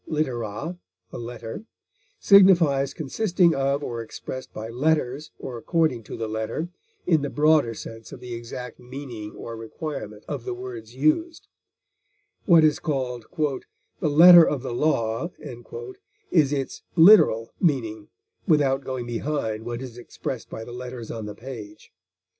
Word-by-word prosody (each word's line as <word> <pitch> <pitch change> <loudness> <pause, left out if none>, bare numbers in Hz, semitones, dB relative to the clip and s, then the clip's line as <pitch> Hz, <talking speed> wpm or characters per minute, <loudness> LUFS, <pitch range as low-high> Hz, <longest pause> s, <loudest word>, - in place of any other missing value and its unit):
litera, 140 - -3 0.3
a - - -7
letter) 115 - -7 0.6
signifies 170 -9 +6
consisting 175 +2 +1
of 140 +1 0
or 115 -3 -4
expressed 130 +3 -8
by 110 +1 -6
letters, 140 +2 0
or 120 -2 -7
according 160 -3 +1
to 105 - -8
the 115 - -3
letter, 110 +10 -3 0.4
in 160 -4 +3
the 145 - -2
broader 150 -6 +3
sense 115 +1 -9
of - - -9
the 125 -1 -8
exact 120 +1 -7
meaning 125 -4 -8
or 115 - -7
requirement 115 -1 -7
of 140 -5 -4
the 120 - -4
words 120 -2 -8
used; 235 - 0 1.0
what 170 -4 +6
is 155 -1 +3
called 125 -6 -3 0.7
"the 155 - +1
letter 170 +3 +9
of 145 -5 -1
the 125 - -4
law" 120 +1 0 1.0
is 150 -6 +4
its 135 -2 -3
literal 160 - +6
meaning 115 - 0 0.4
without 140 -3 +3
going 130 -2 -4
behind 120 -2 -2
what 120 +2 -4
is 125 -2 -9
expressed 120 0 -6
by 110 - -6
the 120 - -9
letters 125 -2 -7
on 110 -2 -5
the 105 - -7
page. 110 -7 -10
130 Hz, 140 wpm, -24 LUFS, 115-155 Hz, 1.0 s, letter